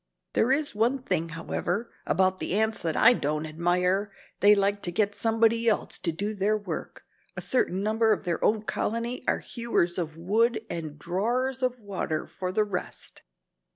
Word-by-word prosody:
"There 240 - +3
is 285 +2 +1
one 240 +5 +1
thing, 170 -7 -1
however, 175 +6 -3
about 185 0 +2
the 180 - -2
ants 220 +1 +1
that 160 -2 -1
I - - +7
don't 150 -6 -1
admire. 180 +5 0 0.3
They 205 +1 +7
like 200 0 +1
to 175 - -3
get 205 +3 +1
somebody 230 +1 +2
else 210 - -1
to 170 - -1
do 205 +7 -3
their 210 +1 +1
work. 205 - -6 0.3
A - - -2
certain 195 -6 0
number 220 +1 +2
of 210 - +1
their 170 -3 -2
own 215 0 +2
colony 230 +3 -2
are - - +3
'hewers 230 -8 -1
of 160 -2 -4
wood 220 +7 +2
and 160 -3 -5
drawers 240 - -1
of 250 -1 0
water' 190 -7 -3
for 185 -1 -5
the 215 +3 +2
rest. 195 -4 -6
205 Hz, 175 wpm, -27 LUFS, 175-225 Hz, 0.3 s, I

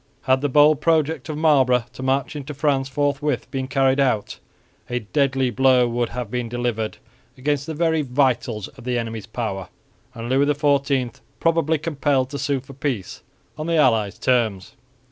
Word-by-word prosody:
Had 130 0 +2
the 145 - 0
bold 150 +2 +5
project 160 -3 +1
of 150 - -3
Marlborough 130 -6 +3
to - - -9
march 135 +1 0
into 145 0 -6
France 135 -2 0
forthwith 145 -1 -1
been 130 -1 -3
carried 135 0 +2
out, 125 -7 0 0.5
a 125 0 -2
deadly 135 +2 0
blow 130 -1 +4
would 120 0 -1
have 120 -3 -5
been 125 -2 -2
delivered 120 -2 -2 0.4
against 140 +2 -1
the 160 - -4
very 160 0 +1
vitals 125 -6 0
of 135 -3 -15
the 125 0 -1
enemy's 115 -3 -4
power 100 -6 -4 0.5
and 115 0 -6
Louis 135 +3 +2
XIV 140 -3 +1 0.2
probably 165 -1 +2
compelled 145 -4 0
to 140 - -4
sue 140 -2 -1
for 135 +1 -13
peace 130 -8 -4 0.4
on 155 - -3
the 165 -1 +1
allies' 110 - +2
terms. 110 -7 0
135 Hz, 165 wpm, -22 LUFS, 120-145 Hz, 0.5 s, bold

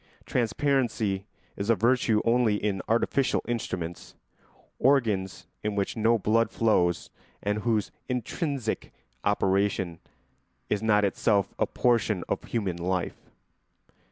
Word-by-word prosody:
Transparency 115 -5 0 0.3
is 100 +2 -4
a 115 - +6
virtue 115 0 +2
only 115 -2 +3
in 100 -2 -1
artificial 130 +4 +1
instruments, 90 -8 -4 0.6
organs 110 -9 +2 0.2
in 105 -1 -2
which 100 -1 -1
no 115 +1 +3
blood 110 +2 +2
flows 90 -7 +1 0.3
and 105 +1 0
whose 110 -2 0 0.2
intrinsic 125 0 -2 0.3
operation 95 -3 +1 0.7
is 105 - +1
not 105 -2 +3
itself 100 +1 +1
a - - +2
portion 110 -6 +1
of - - -2
human 100 -7 -2
life. 90 +1 -3
105 Hz, 110 wpm, -27 LUFS, 100-115 Hz, 0.7 s, a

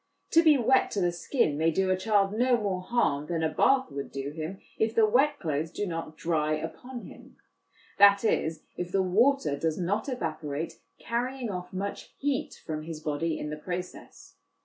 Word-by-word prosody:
To 330 - +7
be 310 -3 +6
wet 260 +2 +3
to 205 - 0
the 175 -2 +2
skin 170 - 0
may 160 +1 +3
do 185 +3 +1
a - - +4
child 200 0 +2
no 245 +2 +3
more 200 -4 -2
harm 160 -9 0
than 165 -2 -1
a 160 - +2
bath 265 - +3
would 140 0 -5
do 140 +1 -4
him, 160 +5 -5 0.2
if 220 0 +1
the 225 - +6
wet 275 +7 +3
clothes 155 - -2
do 205 +5 -3
not 165 -3 -5
dry 155 -2 0
upon 235 +11 -7
him - - -13 0.6
that 200 +1 +7
is, 160 -7 0
if 180 0 -4
the 195 -1 +2
water 230 - +3
does 160 +2 -1
not 200 +8 -1
evaporate, 160 - -4 0.2
carrying 245 0 -2
off 180 -1 -6
much 195 +2 -5
heat 280 -2 -2
from 155 -1 -3
his 160 0 -7
body 155 +1 -1
in 150 - -5
the 150 - -4
process. 180 +3 -7
185 Hz, 190 wpm, -28 LUFS, 160-230 Hz, 0.6 s, To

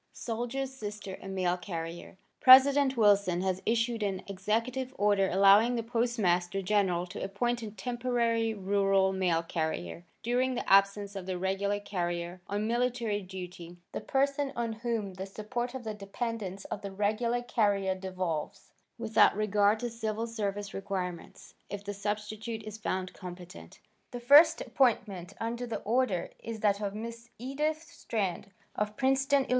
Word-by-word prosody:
Soldier's 245 +3 -3
Sister 205 -5 -7
a - - -9
Mail 185 -2 0
Carrier 170 -1 -6 0.2
President 270 +1 +7
Wilson 200 -5 +4
has 190 0 -1
issued 230 0 +1
an 195 -2 -2
executive 230 +7 -2
order 200 -2 +3
allowing 200 +5 +6
the 230 - -1
Postmaster 210 -6 0
General 185 -3 +1
to 180 - -8
appoint 240 +5 -1
as 220 -2 -6
temporary 235 0 0
rural 195 -1 +2
mail 180 -3 +1
carrier, 160 - -3 0.2
during 250 +2 +1
the 245 - -4
absence 200 +1 +4
of 190 -2 -6
the 185 -1 -2
regular 195 +2 0
carrier 175 -2 -3
on 205 +1 -1
military 235 -2 0
duty, 180 -2 -8
the - - -4
person 280 +1 0
on 235 -1 -2
whom 220 -3 -3
the 190 +1 -6
support 240 +5 -4
of 260 - -5
the 220 -1 -4
dependents 200 -1 -5
of 205 - -5
the 200 -1 -6
regular 220 +5 0
carrier 205 -5 +1
devolves, 185 -4 -4 0.3
without 225 -2 +4
regard 210 0 +3
to 240 - -2
civil 225 -1 -3
service 205 -3 -3
requirements, 185 -3 -5 0.2
if 205 0 -6
the 205 0 -4
substitute 210 +2 -4
is 215 -1 -7
found 185 -4 -3
competent. 180 -1 -10 0.3
The 245 - -6
first 300 +7 +7
appointment 225 -8 0
under 235 +2 -3
the 230 - -4
order 220 -6 0
is 225 -2 -6
that 205 -1 +2
of 200 -1 -3
Miss 230 +2 -7
Edith 300 +6 -2
Strand, 200 - -3 0.2
of 210 0 -2
Princeton, 270 +1 +2
Ill. - - -16
210 Hz, 150 wpm, -30 LUFS, 190-235 Hz, 0.3 s, President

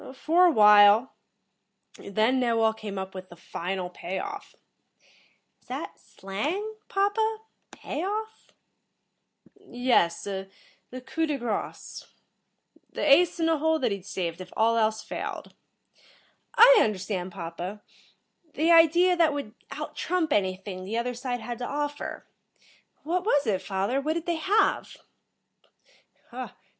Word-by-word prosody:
"For 335 +6 +3
a - - +4
while. 210 0 +6 0.9
Then 220 +6 +1
Knowall 230 -3 +2
came 205 -3 -7
up 190 0 -5
with 185 -1 -9
the 175 - -12
final 180 +1 -5
pay 180 +1 -5
off." 405 0 -7 1.1
"Is - - -31
that - - -6
slang, 300 - -4 0.2
papa? 435 +2 0 0.3
Pay 310 - -6
off?" 435 +3 -5 1.0
"Yes. 245 - 0
The 200 +5 -9
coup 325 +3 -1
de 295 -2 -1
grace. 235 -4 -5 0.8
The - - -3
ace 345 +5 +5
in 325 - +1
the 325 -2 +2
hole 320 +1 +2
that 250 -7 0
he'd 200 -1 -5
saved, 175 -3 -4
if 185 - -10
all 225 +1 +3
else 220 -1 +1
failed." - - -6 1.0
"I - - +8
understand, 190 -3 -2
papa. 175 +5 -7 0.7
The 320 +3 +2
idea 340 +2 +6
that 330 -3 +3
would 280 -7 -5 0.2
out - - -7
trump 340 -4 -1
anything 190 -1 -2
the 210 +5 -4
other 245 +1 -1
side 245 0 -4
had 235 +1 -6
to 245 - -4
offer. 290 0 -4 0.8
What 350 +4 -1
was 290 -9 +2
it, 200 -5 0
father? 200 +7 -1
What 310 +3 -1
did 335 0 -4
they 340 -2 -1
have?" 390 +7 +1
245 Hz, 130 wpm, -26 LUFS, 200-330 Hz, 1.1 s, I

